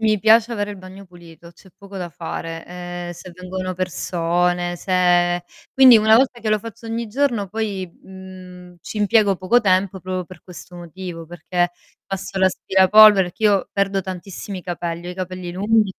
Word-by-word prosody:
Mi 215 -2 +1
piace 225 +2 +4
avere 205 -2 -3
il 205 - -8
bagno 190 +1 -12
pulito, 170 -1 -15
c'è 185 +2 -20
poco 200 0 -12
da 180 -2 -5
fare, 165 0 -7
ehm, 175 0 -7
se 175 +1 -11
vengono 185 +1 -5
persone, 175 0 -1
se 175 -1 +2 0.3
quindi 260 -3 +8
una 220 0 +5
volta 255 +1 +3
che 220 - -3
lo 215 0 +1
faccio 230 +1 -10
ogni 230 0 -4
giorno 235 -4 -1
poi, 205 -2 -3 0.2
mhmm, 185 -1 -12
ci 215 - -7
impiego 210 -1 +3
poco 185 +7 +2
tempo 190 -2 +1
proprio 185 0 -4
per 180 -1 -14
questo 180 0 -12
motivo, 175 -1 -8
perché 175 +1 -2 0.3
passo 195 0 -5
l'aspirapolvere 190 +2 +5
perché 220 - -15
io 205 -3 +2
perdo 195 -1 0
tantissimi 190 +1 -7
capelli, 175 0 -5
ho - - -4
i - - -8
capelli 185 -1 -5
lunghi 205 +2 +1
185 Hz, 170 wpm, -20 LUFS, 175-205 Hz, 0.3 s, quindi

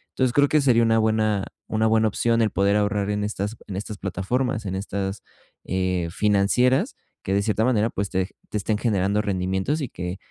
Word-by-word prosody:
Entonces 130 -2 +1
creo 145 0 +4
que 155 -1 +3
sería 120 -4 +4
una 115 0 +3
buena 110 -2 +1 0.2
una 110 0 +1
buena 110 0 +3
opción 115 +3 +1
el 110 - +3
poder 100 +2 +2
ahorrar 105 -1 0
en 105 0 -1
estas 105 +1 -3
en 95 - -6
estas 105 +1 -5
plataformas 110 +6 -2
en 95 -1 -3
estas, 95 0 -3 0.4
eh, 90 -2 -1
financieras 105 +6 +2 0.3
que 95 - -2
de 100 - +3
cierta 110 +1 +1
manera, 115 -3 +2
pues, 100 -2 -3
te 95 0 0
ge - - -29
te 105 - -2
estén 105 +1 -1
generando 100 -2 +1
rendimientos 95 - -1
y 130 - -3
que 90 +1 -5
105 Hz, 200 wpm, -24 LUFS, 95-115 Hz, 0.4 s, creo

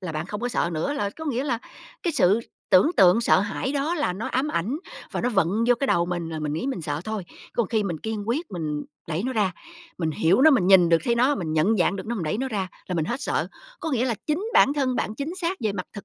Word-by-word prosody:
là 180 -4 -5
bạn 155 +2 -3
không 210 +3 -5
có 245 - -1
sợ 175 -7 0
nữa. 160 - -1
Là 240 -9 -1
có 320 +9 -9
nghĩa 270 -2 -1
là 240 -5 0 0.4
cái 340 - 0
sự 210 -4 +4 0.3
tưởng 185 - +6
tượng 190 +4 +6
sợ 210 - +4
hãi 205 +7 -2
đó 290 +4 0
là 295 - 0
nó 205 +5 -5
ám 265 +3 0
ảnh, 235 - -1 0.3
và - - -2
nó 245 - +1
vận 195 -8 +2 0.2
vô 245 - +6
cái 275 - +1
đầu 170 -8 +2
mình 175 -2 -3
là 160 - -4
mình 150 -1 -2
nghĩ 160 - -2
mình 265 -11 -3
sợ 145 0 -2
thôi, 215 -4 -4 0.3
còn 235 -5 0
khi 220 -2 +1
mình 175 -5 -3
kiên 220 -1 -4
quyết 310 +8 -1
mình 155 -5 -3 0.2
đẩy 165 +3 -1
nó 260 - -1
ra, 205 -6 +1 0.5
mình 160 -3 0
hiểu 170 - +2
nó, 315 - +8
mình 245 -11 +3
nhìn 185 -3 +7
được 165 0 +5
thấy 235 - +2
nó, 255 +5 +3
mình 165 - -3
nhận 175 +8 +3
dạng 180 +1 +2
được 195 - -6
nó, 235 - -2
mình 185 -8 -3
đẩy 155 +8 -1
nó 265 +1 -1
ra 200 -6 -2 0.2
là 180 - -3
mình 160 - 0
hết 240 - -3
sợ. - - -1 0.3
Có 320 - -3
nghĩa 250 -2 +1
là 245 -3 0
chính 310 +7 0
bản 280 - +6
thân 265 -4 0
bạn 215 - -2
chính 285 +8 -4
xác 350 +3 -1
về 215 -3 0
mặt 185 -2 -5
thực 200 - -9
210 Hz, 285 wpm, -25 LUFS, 175-260 Hz, 0.5 s, nó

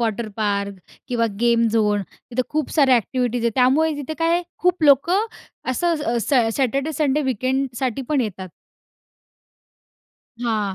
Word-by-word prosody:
Water 225 -1 -1
park 200 -2 -1 0.3
किंवा 235 -2 +1
game 235 -1 +3
zone 210 -2 +1
तिथं 255 +1 -4
खूप 305 -2 -2
साऱ्या 275 -5 +5
ॲक्टिव्हिटीज 245 +1 -1
आहेत. 235 -1 +1
त्यामुळे 275 +6 +3
तिथे 290 +2 -5
काय 330 0 +2
आहे 350 - +2 0.2
खूप 360 -2 +1
लोकं 340 - +4 0.4
असं 340 +7 +1
स 235 0 0
सॅ 245 -5 +3
सॅटर्डे-संडे 280 +2 0
वीकेंडसाठी 260 0 -1
पण 295 -3 +2
येतात. 190 -4 -4 2.0
हां, 210 -4 -1
255 Hz, 135 wpm, -21 LUFS, 230-290 Hz, 2.0 s, साऱ्या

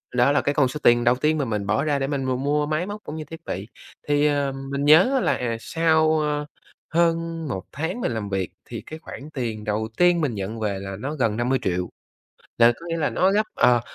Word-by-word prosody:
Đó 125 +3 +4
là 145 - +3
cái 145 - 0
con 140 -4 +3
số 150 +4 -5
tiền 120 0 +5
đầu 120 0 +4
tiên 155 +4 +1
mà 140 - 0
mình 105 -4 -2
bỏ 105 +6 +1
ra 145 -2 +1
để 135 - -1
mình 140 -2 -2
m 130 +1 -1
mua 150 +1 +1
máy 155 +4 -1
móc 210 +1 -7
cũng 150 - -7
như 155 - -5
thiết 165 +2 -10
bị. 100 +3 -5 0.4
Thì, 145 0 +3
à, 145 -2 +1 0.2
mình 140 +1 -1
nhớ 185 - +6
là, - - +2
à, 115 -2 -2
sau, 160 +1 +2
a, 150 -1 -1 0.5
hơn 165 -1 +1
1 95 -8 -4
tháng 165 +10 -3
mình 125 - 0
làm 105 -3 -3
việc 95 -2 -1 0.2
thì - - -7
cái 155 +1 -8
khoản 150 -2 -9
tiền 115 -5 -3
đầu 105 +1 -1
tiên 175 -1 +4
mình 135 -8 -1
nhận 100 +3 -4
về 100 -3 -2
là 95 0 -6
nó 145 +6 -4
gần 115 -6 0
50.000.000. 110 -8 0 0.7
Là 115 0 +7
có 170 - -13
nghĩa 165 0 -2
là 150 - +1
nó 190 +1 +2
gấp, 210 +2 +3
ờ, 120 -1 +4
140 Hz, 240 wpm, -24 LUFS, 115-155 Hz, 0.7 s, Là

